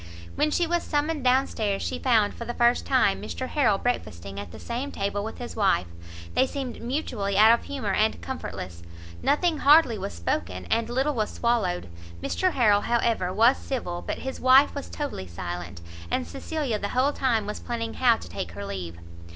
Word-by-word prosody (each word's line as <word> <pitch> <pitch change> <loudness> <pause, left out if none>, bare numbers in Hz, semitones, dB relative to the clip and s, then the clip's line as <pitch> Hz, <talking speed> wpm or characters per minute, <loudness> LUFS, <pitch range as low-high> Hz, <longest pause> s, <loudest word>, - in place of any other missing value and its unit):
When 305 - +1
she 345 +3 +1
was 345 +1 0
summoned 300 -1 -1
down 260 +2 +4
stairs, 205 -3 -2
she 255 - -3
found, 225 -5 +3
for - - -7
the 240 +1 -5
first 240 0 +3
time, - - +3
Mr 260 - -4
Harrel 240 -10 +2
breakfasting 100 - -3
at 100 - -7
the - - -10
same 250 +4 -4
table 200 +1 -2
with 220 - -6
his 245 - -7
wife; 195 - +2 0.5
they 260 - +3
seemed 260 -3 -5
mutually 235 -6 -2
out 215 +2 +8
of 235 - 0
humour 240 -9 -3
and 215 +2 +2
comfortless, 90 - -6 0.4
nothing 320 +1 +2
hardly 280 -7 +5
was - - -4
spoken, 85 +2 -3
and 230 0 +1
little 265 +5 +1
was 215 -4 -1
swallowed; 215 - 0 0.3
Mr 370 - 0
Harrel, 210 -5 +4
however, 230 -6 +1
was 230 +7 +4
civil, 175 -10 -4
but - - -4
his 265 - -5
wife 260 +2 +6
was 280 - -6
totally 285 - -5
silent, 85 +1 -6 0.3
and 80 - -1
Cecilia 255 - -3
the 200 - -3
whole 265 +3 +2
time 235 -7 +1
was 210 - -5
planning 230 -1 -4
how 240 -3 +4
to - - -10
take 85 -1 -5
her 100 +2 -6
leave. 90 -4 -6
230 Hz, 190 wpm, -26 LUFS, 185-265 Hz, 0.5 s, out